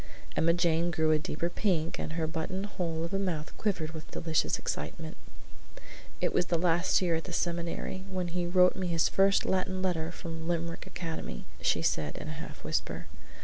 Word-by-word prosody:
Emma 170 - +4
Jane 170 -1 +3
grew 160 -1 +2
a 155 - +4
deeper 155 +2 -1
pink 175 -3 0
and 155 - -3
her 165 -1 0
button 165 +4 -2
hole 170 -5 -2
of 170 - -3
a 195 - +2
mouth 170 -6 -2
quivered 180 -7 0
with 160 -1 -8
delicious 160 -2 +1
excitement. - - -4 1.0
"It - - +1
was 180 - +1
last 170 +1 +3
year 175 -2 +2
at 165 0 -1
the 185 - -6
seminary, 170 +2 -1
when 185 -2 -1
he 175 0 -1
wrote 180 +1 +5
me 185 -1 -1
his 165 -2 +3
first 195 0 +4
Latin 185 0 +1
letter 170 -3 0
from 165 -2 -6
Limerick 170 -1 -2
Academy," 160 - -5 0.2
she - - +2
said 75 -2 +1
in - - -5
a 155 +1 -5
half - - -9
whisper. 85 - -1
170 Hz, 185 wpm, -31 LUFS, 160-180 Hz, 1.0 s, wrote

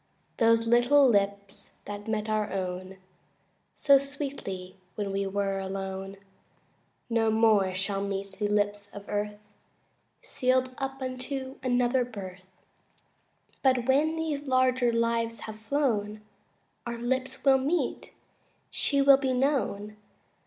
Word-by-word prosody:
Those 230 0 +4
little 245 +4 +5
lips 200 -2 -1 0.2
that 205 +1 -7
met 215 -1 -1
our 215 -1 -1
own 185 0 -4 0.8
So 280 -2 +5
sweetly 270 -10 -6 0.2
when 205 -2 -3
we 195 0 -1
were 195 0 -1
alone 195 0 -5 0.9
No 230 -1 +2
more 215 -4 +3
shall 195 +1 -1
meet 200 0 -5
the 210 - +1
lips 205 -1 0
of 205 0 -9
earth, 210 0 -2 0.9
Sealed 255 - 0
up 270 0 -4
unto 260 +1 -5
another 250 0 +2
birth; 190 -6 -9 1.1
But 255 -3 +2
when 295 +4 +3
these 305 -3 -3
larger 255 -2 +3
lives 230 -1 0
have 220 0 -8
flown 220 -4 -1 0.7
Our 235 0 -4
lips 260 +2 -2
will 270 -1 +6
meet; 300 +7 -1 0.6
she 280 -1 +1
will 275 -1 +8
be 265 -2 -1
known. 250 -6 -1
230 Hz, 120 wpm, -28 LUFS, 200-260 Hz, 1.1 s, will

